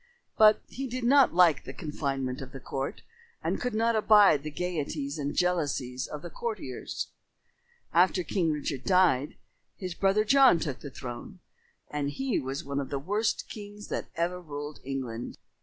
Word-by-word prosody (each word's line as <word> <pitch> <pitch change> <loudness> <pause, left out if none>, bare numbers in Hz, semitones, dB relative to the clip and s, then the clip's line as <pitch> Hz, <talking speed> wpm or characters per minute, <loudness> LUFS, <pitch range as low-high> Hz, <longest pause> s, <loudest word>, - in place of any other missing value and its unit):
But 215 -1 +6
he 270 +1 -5
did 255 0 -4
not 270 +3 +6
like 170 -5 +5
the - - -8
confinement 135 -4 -3
of 135 -1 -9
the 135 - -7
court 135 +1 -4 0.4
and - - -1
could 250 -3 -2
not 230 +1 +2
abide 210 -8 +6
the 155 - -5
gaieties 150 -3 -3
and 145 0 -2
jealousies 145 -8 0
of 150 -1 -7
the 175 - -7
courtiers. 210 - -4 0.8
After 180 +1 +4
King 170 -1 0
Richard 145 -3 -3
died, 180 -8 +3 0.4
his 185 -2 -4
brother 195 +4 +2
John 265 -3 +6
took 145 -6 -3
the 145 - -7
throne, 130 +8 -8 0.5
and 145 -1 -2
he 265 - -1
was 135 +1 -4
one 140 0 -3
of 140 - -4
the 140 - -2
worst 205 +10 -1
kings 205 -1 -9
that - - -3
ever 175 +2 -1
ruled 145 -2 -7
England. 130 -3 -5
160 Hz, 165 wpm, -29 LUFS, 140-205 Hz, 0.8 s, But